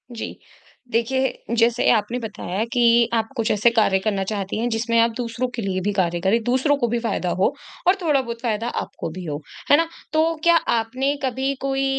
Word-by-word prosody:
जी, 225 Hz, -, -5 dB, 0.6 s
देखिए 250 Hz, +1 st, -1 dB
जैसे 230 Hz, +1 st, +3 dB
आपने 235 Hz, +2 st, +1 dB
बताया 210 Hz, -3 st, -4 dB
कि 235 Hz, -1 st, +4 dB
आप 225 Hz, -1 st, +1 dB
कुछ 225 Hz, -1 st, +1 dB
ऐसे 215 Hz, +3 st, +4 dB
कार्य 210 Hz, -4 st, +3 dB
करना 200 Hz, -1 st, -1 dB
चाहती 200 Hz, -2 st, -3 dB
हैं 235 Hz, -, 0 dB
जिसमें 230 Hz, 0 st, 0 dB
आप 230 Hz, 0 st, +4 dB
दूसरों 240 Hz, +1 st, -2 dB
के 235 Hz, -, -3 dB
लिए 190 Hz, -2 st, -2 dB
भी 205 Hz, +3 st, 0 dB
कार्य 175 Hz, -3 st, 0 dB
करें, 200 Hz, +5 st, +2 dB
दूसरों 260 Hz, +5 st, +2 dB
को 240 Hz, -4 st, 0 dB
भी 235 Hz, +1 st, 0 dB
फायदा 225 Hz, -6 st, -1 dB
हो 235 Hz, -, +3 dB, 0.3 s
और 365 Hz, -, +6 dB
थोड़ा 300 Hz, -5 st, +2 dB
बहुत 235 Hz, -2 st, -7 dB
फायदा 230 Hz, -2 st, -1 dB
आपको -, -, -6 dB
भी 185 Hz, +2 st, -7 dB
हो। 150 Hz, -1 st, -4 dB, 0.3 s
है 290 Hz, -, +8 dB
ना? 330 Hz, +1 st, +2 dB, 0.3 s
तो 320 Hz, +1 st, +2 dB
क्या 340 Hz, 0 st, +6 dB, 0.2 s
आपने 255 Hz, +5 st, -1 dB
कभी 265 Hz, +1 st, 0 dB
कोई 270 Hz, 0 st, 0 dB
230 Hz, 200 wpm, -22 LUFS, 215-260 Hz, 0.6 s, है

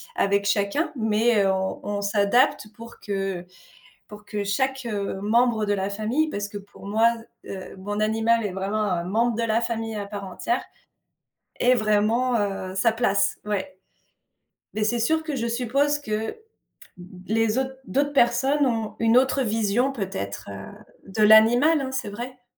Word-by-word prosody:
avec 200 Hz, 0 st, +1 dB
chacun, 205 Hz, +11 st, 0 dB
mais 220 Hz, -1 st, +2 dB
on 190 Hz, 0 st, -2 dB
on 205 Hz, 0 st, -2 dB
s'adapte 210 Hz, +4 st, +2 dB
pour 230 Hz, +1 st, -12 dB
que 195 Hz, -3 st, -3 dB, 0.6 s
pour 210 Hz, 0 st, -12 dB
que 210 Hz, -1 st, -3 dB
chaque 265 Hz, +5 st, -1 dB, 0.3 s
membre 225 Hz, +1 st, +2 dB
de 205 Hz, -, +2 dB
la 195 Hz, 0 st, -1 dB
famille 230 Hz, +10 st, 0 dB
parce 205 Hz, 0 st, -3 dB
que 205 Hz, -, -7 dB
pour 200 Hz, 0 st, -12 dB
moi, 220 Hz, +3 st, +3 dB, 0.4 s
heu, 190 Hz, -1 st, -8 dB
mon 205 Hz, +2 st, -4 dB
animal 225 Hz, +1 st, +2 dB
est 195 Hz, -, -2 dB
vraiment 195 Hz, +3 st, -2 dB
un 180 Hz, -5 st, 0 dB
membre 225 Hz, +5 st, +1 dB
de 235 Hz, -, 0 dB
la 230 Hz, 0 st, +1 dB
famille 225 Hz, -1 st, -3 dB
à 205 Hz, -, -4 dB
part 200 Hz, -1 st, -6 dB
entière 195 Hz, -, -2 dB, 1.0 s
est 250 Hz, +1 st, +4 dB
vraiment, 220 Hz, +3 st, +2 dB
heu, 195 Hz, -2 st, -3 dB
sa 210 Hz, +4 st, +3 dB
place, 200 Hz, -3 st, +1 dB
ouais, 190 Hz, -2 st, -3 dB, 1.0 s
mais 215 Hz, -, 0 dB
c'est 240 Hz, +2 st, +1 dB
sûr 315 Hz, +8 st, +1 dB
que 310 Hz, -3 st, -3 dB
je 235 Hz, -2 st, -2 dB
suppose 265 Hz, +5 st, +1 dB
que 250 Hz, -7 st, -9 dB
l 225 Hz, -, -5 dB, 0.9 s
les 225 Hz, +1 st, +1 dB
autres 265 Hz, 0 st, -3 dB
d'autres 285 Hz, +2 st, 0 dB
personnes 275 Hz, +3 st, +3 dB
ont 225 Hz, -4 st, -1 dB
une 230 Hz, +1 st, +4 dB
autre 265 Hz, +2 st, +3 dB
vision 225 Hz, +3 st, +1 dB
peut-être, 185 Hz, -, -5 dB
heu, 100 Hz, -, -9 dB, 0.3 s
de 210 Hz, +2 st, 0 dB
l'animal, 240 Hz, +9 st, +6 dB
hein, 265 Hz, -, -4 dB
c'est 260 Hz, -6 st, -3 dB
vrai? 245 Hz, +4 st, -8 dB
220 Hz, 160 wpm, -24 LUFS, 200-245 Hz, 1.0 s, l'animal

